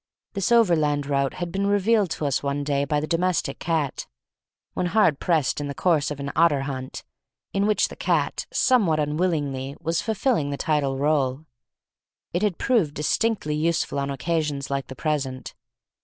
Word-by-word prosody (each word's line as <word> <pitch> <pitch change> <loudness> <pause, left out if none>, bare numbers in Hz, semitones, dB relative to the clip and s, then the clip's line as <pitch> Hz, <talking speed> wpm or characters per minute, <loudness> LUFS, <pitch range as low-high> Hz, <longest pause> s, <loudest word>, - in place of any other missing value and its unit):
This 195 +1 -1
overland 155 -11 +3
route 140 -1 0
had 175 -1 -4
been 195 +2 -1
revealed 205 0 +2
to 150 - -4
us 140 -2 0
one 140 0 -2
day 140 -1 0
by 150 +1 0
the 150 - -2
domestic 170 -4 0
cat, 160 -5 -2 0.7
when 180 - -1
hard 175 -7 +3
pressed 160 -4 +1
in 145 - -3
the 140 - -5
course 160 -5 +2
of 145 -1 -5
an 140 0 -4
otter 155 -4 +4
hunt, 130 -1 -5 0.5
in 200 +1 +1
which 215 - +2
the - - -10
cat - - 0
somewhat 195 -12 +3
unwillingly 145 -4 -1
was 165 0 -1
filling 220 - 0
the 140 - -3
title 140 -4 0
role; 140 -2 +1
and - - -26 0.9
it 175 - 0
had 210 -5 0
proved 210 - +1
distinctly 155 +1 0
useful 160 -1 0
on 140 0 -2
occasions 145 -1 -2
like 135 -2 -2
the 130 - -8
present. 135 -4 -3
150 Hz, 170 wpm, -24 LUFS, 140-180 Hz, 0.9 s, otter